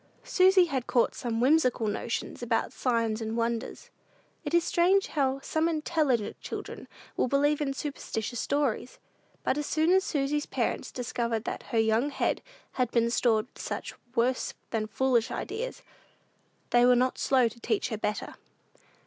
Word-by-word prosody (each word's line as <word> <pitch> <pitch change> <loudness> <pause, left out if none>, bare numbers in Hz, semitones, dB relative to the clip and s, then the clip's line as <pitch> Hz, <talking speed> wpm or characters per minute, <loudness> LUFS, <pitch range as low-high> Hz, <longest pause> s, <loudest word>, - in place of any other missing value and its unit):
Susy 370 0 +5
had 265 -7 -3
caught 245 -2 +2
some 235 -4 -3
whimsical 255 -3 +3
notions 225 +4 -3
about 235 -1 0
"signs 230 -3 0
and 220 +1 -3
wonders." 230 0 -3 0.5
It - - -4
is 340 0 +4
strange 375 +4 +3
how 270 -2 0
some 315 +4 0
intelligent 305 -8 0
children - - -7 0.3
will - - +1
believe 290 +3 +2
in 280 -2 0
superstitious 240 -5 -4
stories! 275 -4 -1 0.5
But 285 - +1
as 295 - -3
soon 315 +2 +2
as 380 +1 +5
Susy's 295 -2 -1
parents - - -2
discovered 235 -2 -2
that - - -4
her 235 - -1
young 225 +5 +3
head - - -1 0.3
had 250 -2 0
been 235 -1 +2
stored 225 -3 +2
with - - -16
such - - -4 0.2
worse 250 +2 +1 0.2
than 215 -1 -1
foolish 240 0 +1
ideas, - - -5 0.9
they 240 0 +5
were 250 0 +6
not 255 +1 +1
slow 255 -3 +3
to 235 +1 -9
teach 400 - -1
her 220 - -3
better. 210 -1 -2
255 Hz, 155 wpm, -28 LUFS, 230-295 Hz, 0.9 s, were